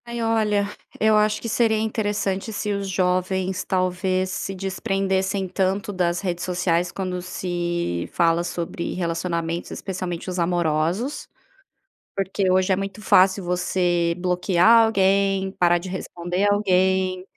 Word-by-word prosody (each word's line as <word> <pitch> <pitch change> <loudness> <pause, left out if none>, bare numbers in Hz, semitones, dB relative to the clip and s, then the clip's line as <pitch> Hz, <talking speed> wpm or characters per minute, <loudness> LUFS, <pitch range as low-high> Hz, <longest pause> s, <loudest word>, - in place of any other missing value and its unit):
Ai 235 0 -5
olha, 215 -3 +1 0.3
eu 220 0 +4
acho 210 0 +2
que - - -6
seria 225 -1 +2
interessante, 210 -2 -1
se 210 0 -2
os 200 -1 -3
jovens, 185 0 0
talvez, 185 0 0
se 195 +1 -4
desprendessem 190 0 -1
tanto 195 +2 -1
das 175 -2 0
redes 175 -3 -3
sociais, 175 -1 0
quando 185 -2 -4
se 175 - -3
fala 170 0 +2
sobre 170 0 -4
relacionamentos, 170 -1 -2
especialmente 185 -3 -5
os 180 -1 -3
amorosos. 170 - 0 0.9
Porque 195 0 0
hoje, 185 +1 +3
é - - +3
muito 195 +1 -5
fácil 190 -1 +4
você 175 -1 0
bloquear 180 +5 +4
alguém, 195 -2 +2
parar 175 -2 +3
de 175 +2 -7
responder 180 +1 -2
alguém, 190 -2 +1
185 Hz, 130 wpm, -23 LUFS, 175-195 Hz, 0.9 s, eu